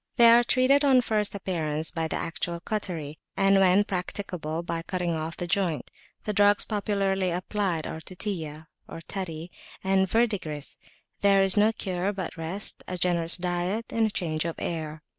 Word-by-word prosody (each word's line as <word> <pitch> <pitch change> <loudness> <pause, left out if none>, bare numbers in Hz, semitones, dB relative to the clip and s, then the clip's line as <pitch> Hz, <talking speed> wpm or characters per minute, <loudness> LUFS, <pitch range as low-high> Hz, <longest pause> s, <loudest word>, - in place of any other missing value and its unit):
They 235 -2 +8
are 240 +1 +7
treated 260 +4 +4
on 265 -3 +5
first 210 -3 0
appearance 160 -5 -1
by 165 -2 -2
the - - -3
actual 170 +1 -3
cautery, 170 -7 -4 0.2
and, 195 0 +5
when 190 +1 +5
practicable, 180 -4 -4
by 170 -1 -3
cutting 175 0 -2
off 160 0 -3
the 175 - -3
joint; 175 -3 -1 0.3
the 210 - -2
drugs 205 0 +4
popularly 195 -3 0
applied 180 -1 -1
are 160 - -5
Tutiya 160 -5 -5 0.4
(tutty) 175 -3 -5 0.3
and 190 0 +2
verdigris. 190 -11 -1 0.4
There 195 -1 +5
is 190 -1 +2
no 210 +1 +5
cure 190 -3 -2
but 190 -4 -5
rest, 165 +5 -3
a 180 - -4
generous 170 -1 +2
diet, 180 +5 -2
and 225 -1 +2
change 155 -5 -1
of 170 -1 -3
air. 155 -2 -4
185 Hz, 160 wpm, -27 LUFS, 165-205 Hz, 0.4 s, They